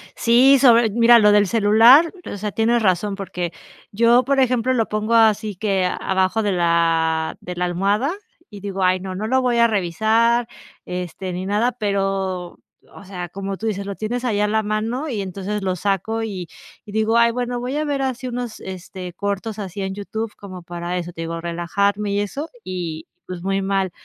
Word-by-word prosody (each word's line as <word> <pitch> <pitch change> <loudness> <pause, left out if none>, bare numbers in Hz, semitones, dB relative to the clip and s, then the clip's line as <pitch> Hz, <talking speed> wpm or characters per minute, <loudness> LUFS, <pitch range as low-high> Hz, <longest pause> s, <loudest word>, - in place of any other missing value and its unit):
Sí, 255 +4 +5
sobre 235 -4 +5
mira 235 +2 +6
lo 210 -1 +5
del 205 0 +4
celular, 230 - +6 0.2
o - - -5
sea, 210 +1 -4
tienes 230 +2 +1
razón, 195 +1 +1
porque 180 -3 -5 0.4
yo 235 +3 +4
por 275 +1 +2
ejemplo, 255 -1 +2
lo 230 -3 +1
pongo 215 +2 -1
así 215 -2 +3
que 195 -2 0 0.2
abajo 190 +3 +1
de 205 - 0
la 165 -2 +1
de 180 - -7
la 180 - -1
almohada 200 - 0 0.4
y 205 -2 -10
digo: 195 -1 -4
"Ay, 185 0 +2
no, 190 0 -6
no 205 +4 -3
lo 260 +3 +2
voy 245 -2 +1
a 235 - +6
revisar, 225 +4 +1 0.4
este, 180 +1 -5
ni 180 +1 -4
nada", 215 +5 +1
pero, 195 -4 -2 0.4
o 200 - -12
sea, 180 -2 -6
como 195 +2 -5
tú 225 - -5
dices, 200 -2 -2
lo 200 - -4
tienes 240 +3 -3
ahí 210 -4 0
a 210 - +2
la 220 +1 +1
mano 225 +7 -2
y 230 -7 -3
entonces, 195 +2 -4
lo 185 -1 -1
saco 200 +4 -1
y 190 -6 -5 0.4
y 205 - -11
digo: 220 +2 +2
"Ay, 235 0 +5
bueno 245 0 -3
voy 255 +3 -3
a 305 - 0
ver 285 -2 -1
así 260 -1 -3
unos, 240 -3 -5
este, 185 -1 -8
cortos 200 +3 -4
así 195 -1 -5
en 190 0 -3
YouTube", 220 +2 -5
como 185 -3 -10
para 175 +1 -5
eso 175 0 -6
te 165 - -7
digo 165 0 -4
relajarme 200 +5 -1
y 200 - +1
eso 275 +10 -4 0.2
y, 170 -4 -5 0.2
pues, 180 -1 -7
muy 195 0 -1
mal. 195 -1 0
205 Hz, 195 wpm, -21 LUFS, 185-230 Hz, 0.4 s, mira